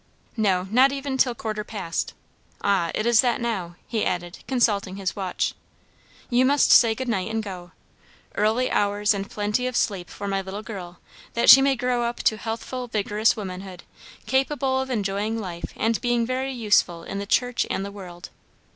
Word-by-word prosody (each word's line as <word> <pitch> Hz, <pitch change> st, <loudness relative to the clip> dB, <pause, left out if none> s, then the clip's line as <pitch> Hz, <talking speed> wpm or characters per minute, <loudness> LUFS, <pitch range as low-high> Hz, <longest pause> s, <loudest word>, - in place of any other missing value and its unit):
"No, 195 Hz, -5 st, +2 dB
not 260 Hz, +4 st, +5 dB
even 275 Hz, 0 st, -4 dB
a -, -, -1 dB
till 250 Hz, -2 st, +2 dB
quarter 215 Hz, -2 st, -4 dB
past. 195 Hz, -6 st, -4 dB, 0.5 s
Ah, 195 Hz, -4 st, +2 dB
it 215 Hz, -, -1 dB
is 235 Hz, -2 st, +5 dB
that 245 Hz, -2 st, +1 dB
now," 195 Hz, -8 st, -3 dB
he 220 Hz, -2 st, -1 dB
added, 175 Hz, 0 st, -3 dB
consulting 210 Hz, -7 st, +1 dB
his 195 Hz, -1 st, -3 dB
watch. 190 Hz, -3 st, -2 dB, 0.7 s
"You 245 Hz, 0 st, +3 dB
must 280 Hz, +2 st, +4 dB
say 225 Hz, -2 st, +7 dB
good 260 Hz, +2 st, -4 dB
night 215 Hz, -4 st, -1 dB
and 220 Hz, 0 st, -2 dB
go. 180 Hz, -3 st, -8 dB, 0.6 s
Early 220 Hz, +5 st, +1 dB
hours 205 Hz, +1 st, +2 dB
and 200 Hz, -1 st, -4 dB
plenty 210 Hz, +4 st, -1 dB
of 255 Hz, -, -4 dB
sleep 190 Hz, -7 st, 0 dB
for 200 Hz, -, -6 dB
my 195 Hz, 0 st, 0 dB
little 195 Hz, +2 st, -7 dB
girl, 180 Hz, -6 st, -8 dB, 0.4 s
that 235 Hz, -, +7 dB
she 270 Hz, -, +10 dB
may 275 Hz, 0 st, +3 dB
grow 250 Hz, -1 st, 0 dB
up 235 Hz, 0 st, -1 dB
to 220 Hz, -, +3 dB
healthful, 230 Hz, +3 st, -5 dB
vigorous 215 Hz, 0 st, +1 dB
womanhood, 185 Hz, -2 st, -7 dB, 0.4 s
capable 265 Hz, 0 st, +1 dB
of 265 Hz, -, -5 dB
enjoying 210 Hz, -1 st, -1 dB
life 175 Hz, -5 st, -6 dB
and 225 Hz, 0 st, 0 dB
being 240 Hz, -1 st, +1 dB
very 260 Hz, +2 st, -2 dB
useful 205 Hz, -8 st, +1 dB
in 195 Hz, -, -5 dB
the 200 Hz, -, -5 dB
church 245 Hz, +3 st, +1 dB
and 195 Hz, -, -2 dB
the 200 Hz, -, -6 dB
world." 180 Hz, -3 st, -10 dB
215 Hz, 180 wpm, -24 LUFS, 195-245 Hz, 0.7 s, she